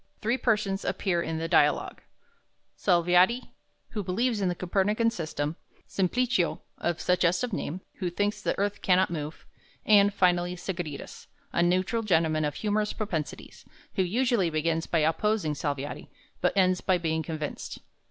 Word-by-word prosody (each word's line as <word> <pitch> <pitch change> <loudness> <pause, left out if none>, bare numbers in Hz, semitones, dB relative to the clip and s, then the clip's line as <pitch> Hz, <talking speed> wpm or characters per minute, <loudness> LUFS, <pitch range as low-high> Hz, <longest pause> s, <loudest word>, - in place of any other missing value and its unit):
Three 235 +4 0
persons 210 -5 +1
appear 175 -4 0
in 160 -1 -3
the 165 +1 -2
"Dialogue": - - +2 0.7
Salviati, 180 +6 +3 0.4
who 210 - -3
believes 220 +4 0
in 190 - +2
the 175 - -1
Copernican 205 +6 +1
system; 155 -4 -3 0.3
Simplicio, 195 0 +1 0.2
of 175 -1 -1
suggestive 180 +6 +1
name, 185 0 -3 0.2
who 185 -3 -1
thinks 205 +4 -1
the - - -1
earth 205 +1 -1
cannot 185 -1 +3
move; 155 -1 -5 0.4
and, 205 -1 +6
finally, 180 -2 +2
Sagredus, 175 -5 -6 0.3
a - - +2
neutral 185 +6 +2
gentleman 160 -6 +2
of 145 -1 -2
humorous 210 +2 0
propensities, 170 -8 -5 0.3
who - - +1
usually 220 0 +2
begins 160 +1 0
by 165 - +1
opposing 165 +1 +1
Salviati, 145 -1 -4 0.3
but - - +1
ends 185 -1 +3
by 185 -2 +2
being 160 -2 -1
convinced. 155 -1 -5
180 Hz, 145 wpm, -28 LUFS, 165-205 Hz, 0.7 s, and